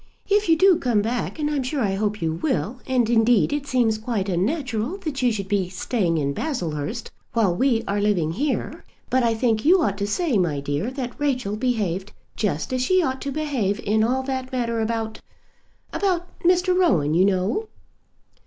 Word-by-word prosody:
If 410 -1 +2
you 325 - +5
do 375 0 +5
come 230 -5 +1
back, 240 +7 -2
and 300 -1 -1
I'm 295 -2 0
sure 260 +2 -2
I 200 -4 +1
hope 210 -1 -1
you 160 -1 0
will; 245 - -2
and 255 -3 +2
indeed 230 +2 +3
it 290 -1 -3
seems 235 -5 +1
quite 215 -4 -2
unnatural 240 - -1
that 310 -8 -4
you 250 -1 +3
should 200 -3 -3
be 195 -3 0
staying 185 -3 -1
in 140 -2 0
Baslehurst, 180 - -3 0.2
while 210 -7 +2
we 245 0 +2
are 205 +1 0
living 185 -7 +1
here. 270 - -2 0.3
But 260 - +3
I 230 -2 +2
think 220 -2 +1
you 360 +5 +5
ought 200 -6 -1
to 200 - -1
say, 260 - +1
my 160 -6 0
dear, 145 - -2
that 255 -1 -6
Rachel 255 -8 0
behaved 205 -5 -1 0.2
just 200 - -2
as 255 - 0
she 370 +7 +3
ought 265 -3 -2
to 280 - -3
behave 260 -9 -1
in 215 +1 +2
all 255 +3 +1
that 260 -1 -4
matter 235 -3 -1
about, 220 0 -3 0.7
about 365 -3 0
Mr. 360 +1 +3
Rowan, 165 - +3
you 175 +3 +4
know." 200 - 0
230 Hz, 190 wpm, -23 LUFS, 200-275 Hz, 0.7 s, you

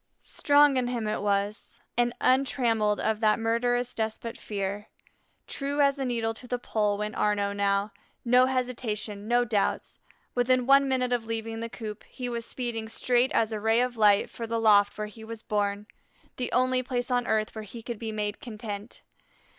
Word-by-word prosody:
Strong 290 -1 +4
in 250 -1 +1
him 240 -3 -2
it 215 - -1
was, 205 +3 -2 0.2
and 240 0 +2
untrammelled 235 -5 +2
of 220 -1 0
that 215 -1 +3
murderous 245 +2 0
despot 225 +1 -3
Fear. 200 0 -4 0.6
True 285 +1 -3
as 280 -1 +3
a 270 - -1
needle 230 -2 -1
to 245 +3 -12
the 245 - -1
Pole 210 -4 0
went 210 +1 -3
Arnaux 205 -1 +1
now, 200 +1 +1 0.3
no 250 +2 +5
hesitation, 230 -5 -3
no 240 +1 +3
doubts; 215 -4 -1 0.3
within 250 0 +2
one 275 +1 +5
minute 255 -2 +1
of 230 -2 -1
leaving 225 0 -3
the 230 0 -4
coop 215 -3 -7
he 250 -2 -6
was 235 -1 -4
speeding 230 -3 -4
straight 245 +2 +2
as 225 0 +2
a 215 - -2
ray 225 +2 +3
of 250 0 0
light 210 -2 +4
for 230 - -7
the 230 0 -1
loft 205 -2 +4
where 210 - -2
he 215 +1 -11
was 225 0 -8
born, 205 -1 -1 0.5
the 250 - -2
only 255 0 +2
place 250 0 -3
on 245 -1 +1
earth 215 -1 0
where 220 - -6
he 225 +3 -10
could 235 -2 -5
be 225 -1 -4
made 210 -1 -3
content. 215 -3 -7
225 Hz, 185 wpm, -27 LUFS, 210-245 Hz, 0.6 s, no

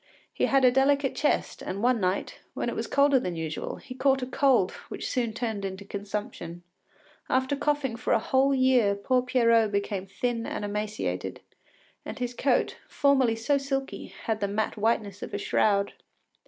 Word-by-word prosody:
He - - +1
had 270 -1 +4
a 250 - +7
delicate 270 +1 +3
chest, 295 - 0
and 195 +3 -4
one 250 -1 +3
night, 185 0 -1 0.2
when - - -1
it - - -4
was - - -3
colder 280 -1 +4
than 180 -7 -3
usual, 160 -1 -4
he 255 - -10
caught 265 0 +2
a - - 0
cold 255 -7 +3 0.2
which - - -5
soon 240 -4 -1
turned 220 -2 -3
into 195 +1 -5
consumption. 200 -4 -6 0.7
After 260 +2 +1
coughing 290 -4 0
for 250 - -2
a - - +5
whole 270 +1 +2
year 255 -6 +4
poor 250 +5 +1
Pierrot 230 -4 +3
became 200 -1 -2
thin 230 +3 -2
and 210 - -3
emaciated, 210 +1 -3 0.6
and - - -7
his 245 -2 -3
coat, 250 +1 +1
formerly 270 -5 +3
so 260 +6 +1
silky, 270 0 -3 0.2
had 220 -1 -1
the 200 - 0
mat 210 +2 -1
whiteness 210 -2 0
of - - -5
a - - 0
shroud. 200 -1 +1
230 Hz, 175 wpm, -27 LUFS, 205-265 Hz, 0.7 s, a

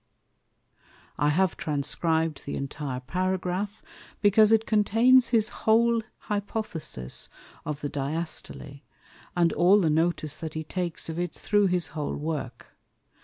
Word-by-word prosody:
_ - - -36 0.4
I 145 - +3
have 180 +3 +2
transcrib'd 160 +1 -1
the - - -3
intire 140 -1 -4
Paragraph, 185 +5 -2 0.4
because 210 +1 +5
it 225 0 +4
contains 230 +4 +4
his 225 -2 +2
whole 230 +1 +3 0.2
Hypothesis 205 - -4 0.4
of 150 -1 -4
the 145 - -2
Diastole, 140 -1 -4 0.6
and 170 -1 +3
all 185 +4 +5
the 165 -5 +2
notice 160 -2 0
that 160 -2 -6
he 155 - -3
takes 175 +1 -3
of 160 +1 -4
it 175 -2 -3
through 205 -1 +2
his 180 -1 0
whole 150 -2 -3
Work. 145 -5 -5
175 Hz, 130 wpm, -27 LUFS, 150-205 Hz, 0.6 s, because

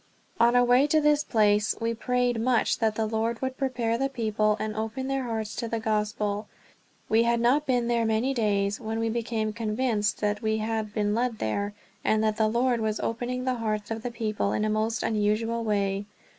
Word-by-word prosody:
On 235 +1 +5
our 245 - +6
way 250 +4 +4
to 310 +1 +3
this 300 0 +3
place 210 -3 +2
we 230 0 0
prayed 245 0 0
much 245 -1 +2
that 220 -2 +1
the 220 - 0
Lord 225 +1 -1
would 260 0 -3
prepare 240 -4 -1
the 270 0 +1
people, 215 -4 0
and 215 0 -3
open 225 +5 -3
their 270 -1 -1
hearts 220 -2 -3
to 235 - -2
the 230 0 -2
Gospel. 210 -1 -1 0.6
We 220 +1 +4
had 235 0 +2
not 270 +6 +2
been 245 -2 +1
there 235 -1 +1
many 225 +4 +1
days 205 -3 0
when 220 0 -3
we 225 0 0
became 225 -2 -2
convinced 220 -1 0
that 205 0 0
we 220 0 0
had 220 -1 -2
been 210 -1 +1
led 235 0 0
there, 200 - -2 0.3
and 215 0 +2
that 215 -1 +1
the 220 - +3
Lord 240 +1 +1
was 215 -1 -1
opening 250 +2 -3
the 255 -2 -1
hearts 215 -1 -2
of 225 0 -3
the 245 - -3
people 215 -3 -2
in 210 - 0
a 215 - 0
most 220 +2 0
unusual 225 +2 0
way. 200 -2 -1
225 Hz, 205 wpm, -27 LUFS, 215-240 Hz, 0.6 s, our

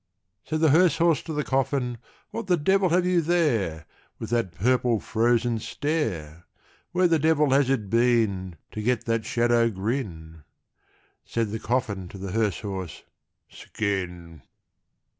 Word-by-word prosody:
Said 155 0 -2
the 160 -3 +5
hearse 170 +1 +4
horse 165 -4 +3
to - - -7
the 150 -1 -1
coffin, 135 -3 -1 0.3
"What 230 -3 -5
the 180 -2 +3
devil 190 +4 +2
have 175 +2 +2
you 180 -1 +3
there, 120 - 0 0.3
With - - -7
that 115 -6 0
purple 125 +3 +2
frozen 115 +1 +1
stare? 90 - -3 0.5
Where 180 +1 +3
the 165 -2 +2
devil 150 -2 +3
has 135 -1 +3
it 120 -7 0
been 110 -5 +1 0.2
To 110 - -5
get 120 +2 0
that 115 -1 -1
shadow 120 0 +2
grin?" 95 - -4 0.8
Said 115 -3 -2
the 110 - -3
coffin 110 -6 -2
to 95 - -10
the 95 -1 -6
hearse 110 0 0
horse, 95 -6 -6 0.4
"Skin!" 90 -6 -4
120 Hz, 145 wpm, -25 LUFS, 100-150 Hz, 0.8 s, the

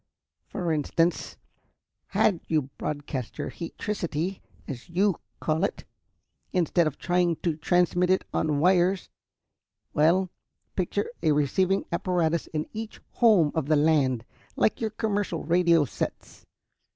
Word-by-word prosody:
For 175 -5 -2
instance, 165 +3 0 0.7
had 185 -6 +2
you 150 -4 0
broadcast 145 -4 -4
your 145 - -3
heatricity, 175 -1 -4 0.3
as 130 0 -7
you 190 +2 +2 0.2
call 155 +1 0
it, - - -1 0.7
instead 175 -2 +2
of 150 - -4
trying 175 -1 +1
to 170 -4 +1
transmit 175 +3 +2
it 185 - +2
on 155 -2 +1
wires 180 +2 +3 0.8
well, 175 +4 +3 0.4
picture 195 +2 -1 0.2
a 155 -3 +3
receiving 185 +7 +1
apparatus 170 -2 0
in 155 -1 -3
each 220 0 -6
home 205 -11 +4
of 160 -4 -1
the 155 - +4
land, 145 -6 +2 0.3
like 220 - +1
your 220 - 0
commercial 205 -5 -2
radio 170 -1 +4
sets. - - -6
170 Hz, 125 wpm, -27 LUFS, 155-185 Hz, 0.8 s, home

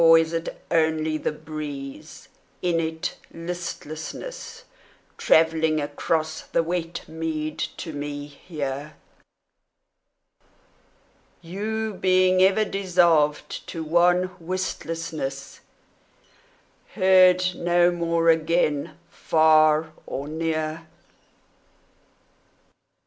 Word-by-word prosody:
Or 165 0 +8
is 165 0 +1
it 165 0 -4
only 160 -1 +1
the - - -1
breeze, 150 -3 -8 0.4
in 175 -2 +2
its 160 +1 -3 0.2
listlessness 170 - -7 0.6
Travelling 160 -1 +3
across 155 +2 -2
the 165 - 0
wet 170 0 -4
mead 160 -1 -4 0.2
to 160 - -6
me 145 0 -5
here, 145 -1 -6 2.5
You 215 +5 -3
being 185 0 +4
ever 195 +3 +4
dissolved 175 -7 +1
to 165 - -5
wan 175 +3 +2
wistlessness, 165 -5 -4 1.4
Heard 185 -1 +5
no 175 0 +3
more 170 -1 +1
again 160 -2 +1
far 155 0 +3 0.2
or 140 +2 -4
near? 160 0 -3
165 Hz, 80 wpm, -24 LUFS, 155-175 Hz, 2.5 s, Or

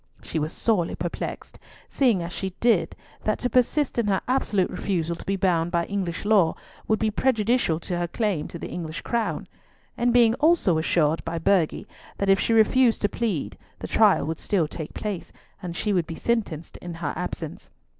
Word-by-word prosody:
She 160 - -3
was 155 +1 -2
sorely 205 -7 0
perplexed, 170 +1 -5 0.3
seeing 235 -10 +2
as 170 +1 -6
she 190 -1 -4
did 230 -7 +2 0.3
that 215 - +1
to 250 - -2
persist 255 +2 +2
in 230 - +1
her 195 -2 +2
absolute 215 -7 +1
refusal 170 -4 -1
to - - -11
be 195 - +1
bound 175 -4 +1
by 170 -1 0
English 195 -3 -3
law 200 -6 +4 0.3
would 220 - +3
be 220 0 0
prejudicial 225 -7 +1
to 175 0 -3
her 175 - -1
claim 195 -5 -1
to - - -8
the - - -6
English 165 -2 -5
crown, 235 -1 -2 0.5
and 240 +1 +2
being 235 -2 +5
also 300 - +4
assured 160 -1 +1
by 165 +1 -3
Burghley 165 -1 +1 0.3
that 200 - 0
if 195 0 +5
she - - 0
refused 230 +2 +4
to 205 - +3
plead 210 -9 -2 0.2
the - - -6
trial - - +4
would 160 0 -3
still 180 -7 +1
take 155 0 -7
place, 205 -5 -4 0.3
and 175 -3 -5
she 210 - 0
would 175 -4 +1
be 165 - -5
sentenced 200 -9 -2
in 175 -1 -7
her 165 -3 -3
absence. - - -5
195 Hz, 190 wpm, -25 LUFS, 170-225 Hz, 0.5 s, being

